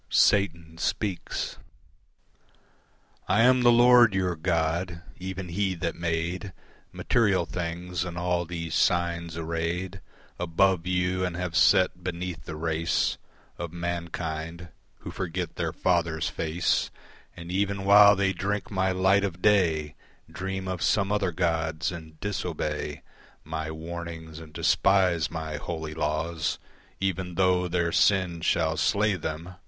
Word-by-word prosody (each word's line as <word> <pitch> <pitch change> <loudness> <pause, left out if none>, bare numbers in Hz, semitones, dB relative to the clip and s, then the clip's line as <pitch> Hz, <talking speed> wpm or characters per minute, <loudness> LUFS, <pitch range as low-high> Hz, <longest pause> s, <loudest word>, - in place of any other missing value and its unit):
Satan 85 -5 +2
Speaks 100 -1 -2 1.7
I 105 +4 +3
am 130 +1 +5
the 120 0 +6
Lord 120 -3 +6
your 90 -2 0
God: 85 +1 -1 0.2
even 95 0 -5
he 95 +1 0
that 85 -1 -2
made 85 +3 -2 0.4
Material 100 -7 +2
things, 90 0 -3
and 90 -2 -6
all 90 0 0
these 85 -1 -5
signs 85 -2 +1
arrayed 85 +3 -3 0.4
Above 90 +1 +2
you 90 0 0
and 90 -2 -2
have 90 -1 -3
set 90 -1 +4
beneath 90 -1 -5
the 80 - -6
race 80 0 0 0.4
Of 85 -2 -4
mankind, 85 -1 -4 0.3
who - - -7
forget 90 -1 -4
their - - -2
Father's 85 -3 0
face 80 +2 0 0.5
And 85 0 -8
even 100 +1 -1
while 100 +1 +8
they 95 0 +1
drink 100 +4 -3
my 95 -1 +1
light 95 +2 +3
of 90 -3 -3
day 85 -8 +2 0.4
Dream 95 +1 -4
of 90 -2 -3
some 100 -1 +2
other 100 -3 +1
gods 80 -1 -1
and 80 -2 -10
disobey 75 -6 -3 0.4
My 80 0 -4
warnings, 80 0 -7
and 80 -2 -12
despise 90 0 +2
my 80 -2 -4
holy 80 0 -5
laws, 80 +1 -1 0.4
Even 95 -2 -2
tho' 90 -1 +2
their 85 -1 0
sin 90 -4 +2
shall 80 -1 +1
slay 105 +1 +2
them. 85 +1 -5
85 Hz, 130 wpm, -27 LUFS, 80-95 Hz, 1.7 s, while